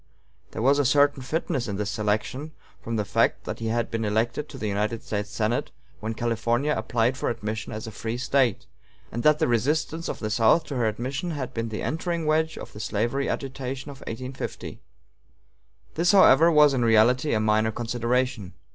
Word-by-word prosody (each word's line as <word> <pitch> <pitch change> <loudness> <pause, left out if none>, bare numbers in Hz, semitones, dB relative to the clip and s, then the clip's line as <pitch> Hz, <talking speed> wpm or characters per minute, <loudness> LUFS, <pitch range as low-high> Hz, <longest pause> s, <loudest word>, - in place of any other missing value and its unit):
There 110 - -5
was 140 +3 +4
a - - +4
certain 145 +1 +3
fitness 140 -2 -2
in 100 - -3
this 100 0 -2
selection, 110 +8 -2 0.3
from 115 - -4
the 105 -2 -1
fact - - +1
that - - -5
he 115 - -3
had 115 +1 -1
been 115 -1 -2
elected 110 +7 -1
to 135 - -9
the 110 - -4
United 105 +3 -1
States 105 -1 -3
Senate 110 +2 -1 0.3
when 110 +1 -4
California 120 +5 0
applied 120 +2 0
for - - -1
admission 110 -2 -4
as 110 - -5
a 110 - -7
free 115 +3 -4
State, 130 -3 +1 0.5
and 120 - -3
that 150 +3 +5
the - - +1
resistance 150 +7 0
of - - -3
the 110 -1 -4
South 115 +9 +4
to 140 - -6
her 120 -2 +2
admission 130 - -3
had 145 -6 -4
been 115 0 -3
the 110 - -4
entering 165 +1 -2
wedge 155 +1 +1
of - - -9
the 105 - -9
slavery 120 +6 -1
agitation 135 +1 -4
of 140 - -12
1850. 130 +3 -6 1.1
This, 175 +4 +2
however, 170 -4 +7
was 150 -2 +6
in 125 -3 +1
reality 120 +5 +4
a - - +2
minor 110 +1 +2
consideration. 120 -2 -1
120 Hz, 190 wpm, -25 LUFS, 110-140 Hz, 1.1 s, however